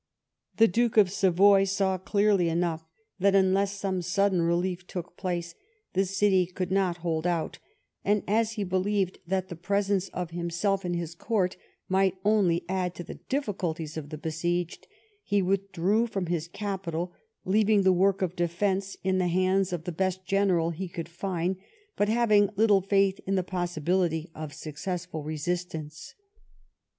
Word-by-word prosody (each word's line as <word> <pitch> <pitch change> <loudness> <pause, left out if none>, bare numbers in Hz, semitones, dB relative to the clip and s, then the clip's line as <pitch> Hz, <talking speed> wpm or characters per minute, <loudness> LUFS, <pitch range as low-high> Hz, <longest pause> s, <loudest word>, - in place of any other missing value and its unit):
The 225 - +7
Duke 230 +3 +1
of 200 -4 +6
Savoy 195 +1 +5
saw 195 -1 0
clearly 200 -2 +2
enough 165 -1 -1 0.3
that 195 +1 +4
unless 195 +1 +3
some 195 -2 -2
sudden 185 +1 +1
relief 175 +1 0
took 180 -1 -6
place 175 -3 -3 0.4
the 195 +1 +2
city 195 -1 +2
could 185 0 -4
not 190 -3 +1
hold 160 0 0
out, 170 -2 -2 0.4
and 205 0 +2
as 225 +2 +1
he 210 -2 -2
believed 190 0 0
that 185 0 -1
the 175 - -6
presence 195 +2 0
of 175 -2 -5
himself 175 +3 -1
and 175 -1 -2
his 170 -1 -4
court 185 0 0 0.3
might 190 0 +2
only 185 -5 +3
add 180 -1 -1
to 175 - -6
the - - -9
difficulties 180 - -2
of 150 -2 -6
the 155 - -6
besieged, 170 +3 -2 0.4
he 205 0 +1
withdrew 195 +3 +1
from 195 -5 -3
his 170 -1 -2
capital, 180 -3 -4 0.3
leaving 210 +1 +3
the 190 0 +5
work 190 +1 +2
of 180 -1 -2
defence 190 +3 -1
in 185 0 +1
the 180 - +2
hands 185 +2 +2
of 175 -3 -3
the 175 - -4
best 185 +2 -2
general 185 -4 +2
he 180 +3 -5
could 165 -1 -6
find, 180 +1 -2 0.4
but 205 - +1
having 215 -3 +4
little 205 -1 +4
faith 195 0 +2
in 195 - +1
the 185 - +1
possibility 175 -2 -1
of 155 -2 -6
successful 170 +3 -5
resistance. 155 0 -4
185 Hz, 160 wpm, -28 LUFS, 170-195 Hz, 0.4 s, The